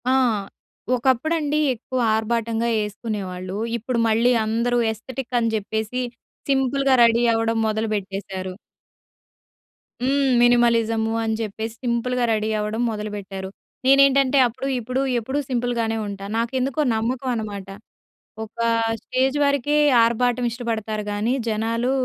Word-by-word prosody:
ఆ! - - +4 0.8
ఒకప్పుడండి 290 +5 +1
ఎక్కువ 255 +2 -5 0.2
ఆర్భాటంగా 230 +1 -1
యేసుకునేవాళ్ళు. 200 -3 -4 0.2
ఇప్పుడు 235 +1 -2
మళ్ళీ 230 +3 +3
అందరూ 235 +3 0
ఎస్థటిక్క‌ని 240 +1 -2
చెప్పేసి 220 +3 -2 0.5
సింపుల్‌గా 270 0 +2
రెడీ 235 +1 +4
అవ్వడం 225 0 0
మొదలుపెట్టేశారు. 200 -3 -3 1.5
హ్మ్. 275 +2 +1 0.2
మినిమలిజము 230 -2 +3
అని 220 0 0
చెప్పేసి 220 +1 -4
సింపుల్‌గా 245 +1 0
రెడీ 215 0 -1
అవ్వడం 210 +2 -2
మొదలుపెట్టారు. 205 -3 -5 0.4
నేనేంటంటే 275 0 +5
అప్పుడు, 240 +3 -5
ఇప్పుడు, 250 +3 -2 0.2
ఎప్పుడూ 265 +5 -2
సింపుల్‌గానే 235 -3 -1 0.4
నాకెందుకో 255 +5 -1
నమ్మకనమాట. 220 -4 -2 0.8
ఒక 220 +1 -17 0.4
స్టేజ్ 260 +3 0
వరకే 280 +1 +1 0.3
ఆర్బాటం 245 +1 +1
ఇష్టపడతారు 225 -2 -3
గానీ 210 +4 0 0.2
జనాలు 225 +3 0
230 Hz, 100 wpm, -22 LUFS, 220-255 Hz, 1.5 s, నేనేంటంటే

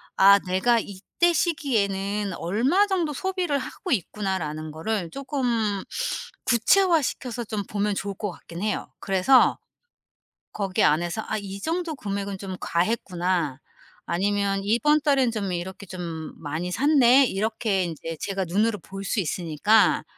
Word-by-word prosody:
'아 200 +1 +7
내가 230 +6 +3
이때 215 - -1
시기에는 205 - 0
얼마 255 - +2
정도 355 -6 0
소비를 365 -2 -1
하고 320 +6 -6
있구나.'라는 180 - -2
거를 175 +3 -3
쪼끔 240 -8 -1 0.6
구체화시켜서 255 - +2
좀 210 -2 -4
보면 205 0 -1
좋을 200 +1 -3
것 205 0 -3
같긴 170 +1 -9
해요. 215 -1 -2
그래서 195 +7 +4 1.0
거기 195 -3 0
안에서 170 +7 +2
'아 220 - -1
이 200 -1 -6
정도 330 -1 -2
금액은 200 -4 -4
좀 190 -1 -6
과했구나.' 175 - -1 0.5
아니면 195 +2 0
'이번 295 +9 +3
달에는 275 -4 +3
좀 200 -4 -2
이렇게 185 +3 -5
좀 170 -4 -6
많이 160 +4 -3
샀네.' 270 +1 +5
이렇게 210 -1 0
인제 165 -1 -5
제가 195 -2 -2
눈으로 210 +5 +1
볼 195 +3 -8
수 205 +3 -1
있으니까 180 +4 +2
200 Hz, 285 characters per minute, -25 LUFS, 185-245 Hz, 1.0 s, 아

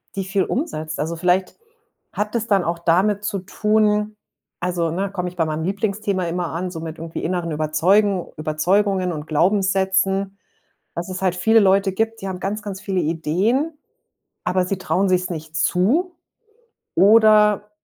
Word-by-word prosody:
die 195 - -2
viel 190 0 0
umsetzt. 160 - -3
Also, 160 +3 -2
vielleicht 180 +2 0 0.6
hat 210 +3 -3
es 230 0 -1
dann 195 -3 +3
auch 170 0 -2
damit 190 +5 +2
zu 200 -1 -2
tun 210 +2 +1 0.5
also, 175 -2 0
ne, 190 +4 -2
komme 180 -2 -3
ich 180 - -16
bei 165 - +1
meinem 155 0 -3
Lieblingsthema 200 0 -1
immer 175 0 -2
an, 180 +3 -3
so 165 -2 -7
mit 160 0 -7
irgendwie 165 0 -6
inneren 175 -1 -2
Überzeugen 175 +6 +2
Überzeugungen 180 +5 +1
und 150 -2 -5
Glaubenssätzen, 195 +2 +1 0.6
dass 175 +2 -4
es 185 0 -5
halt 180 -1 +1
viele 220 +5 +4
Leute 195 -1 +3
gibt, 225 +1 -2
die 195 - -4
haben 180 - -5
ganz, 205 +3 -3
ganz 195 -2 -6
viele 190 -3 -1
Ideen, 185 - 0 0.7
aber 180 0 +1
sie 195 - -2
trauen 190 +1 0
sich's 185 0 +1
nicht 160 -1 -7
zu, 240 - +1 0.9
oder 210 0 +5
190 Hz, 160 wpm, -21 LUFS, 170-205 Hz, 0.9 s, oder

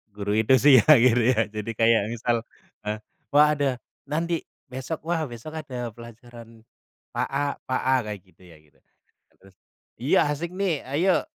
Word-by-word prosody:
guru 100 0 -2
itu 120 +4 +4
sih 130 +1 +7
ya, - - -1
gitu 120 -1 +4
ya. 110 - +1
Jadi 110 +1 -4
kayak 115 -2 +3
misal, 120 0 -1 0.5
eee, 105 0 -1 0.3
"Wah, 150 +1 +5
ada 135 -3 0 0.3
nanti 165 +2 -1 0.2
besok, 130 +5 -6
wah, 170 -1 0
besok 120 +7 -9
ada 125 -5 -6
pelajaran 115 0 -14 0.5
Pak - - -2
A 140 +1 -1 0.2
Pak 130 - -2
A," 130 0 +2
kayak 105 - -5
gitu 95 0 -27
ya, 85 -3 -16
gitu. 75 -1 -27 0.6
Terus, 95 -1 -20 0.5
"Iya, 135 - +3
asik 160 +4 -3
nih! 185 -6 -1
Ayo, 165 +8 +1
125 Hz, 165 wpm, -25 LUFS, 115-145 Hz, 0.6 s, sih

